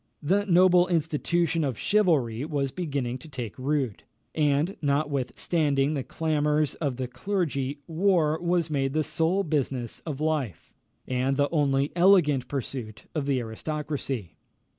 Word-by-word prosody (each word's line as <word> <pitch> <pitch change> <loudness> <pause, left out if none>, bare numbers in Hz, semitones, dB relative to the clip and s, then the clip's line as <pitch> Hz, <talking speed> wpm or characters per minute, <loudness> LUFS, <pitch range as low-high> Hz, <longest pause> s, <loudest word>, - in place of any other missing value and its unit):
The 200 +7 +1
noble 180 0 +5
institution 165 0 0
of 130 -6 -2
chivalry 150 - +2
was 140 -4 -1
beginning 140 -8 -3
to 160 - -12
take 120 -7 -6
root, 135 -5 -1 0.3
and, 150 +4 +1
notwithstanding 140 0 0
the 140 - -1
clamours 150 -1 0
of 140 -6 -3
the 130 -1 -2
clergy, 140 -1 -2
war 165 -2 +2
was 170 -2 0
made 135 -2 0
the 155 0 +1
sole 170 +6 +1
business 135 - -2
of 150 -4 -6
life, 150 - -2 0.3
and 130 +1 0
the 145 0 +2
only 140 -3 +1
elegant 170 -8 +4
pursuit 125 -5 -5
of 150 -3 -2
the 135 -2 +2
aristocracy. 130 - -4
145 Hz, 135 wpm, -27 LUFS, 135-165 Hz, 0.3 s, noble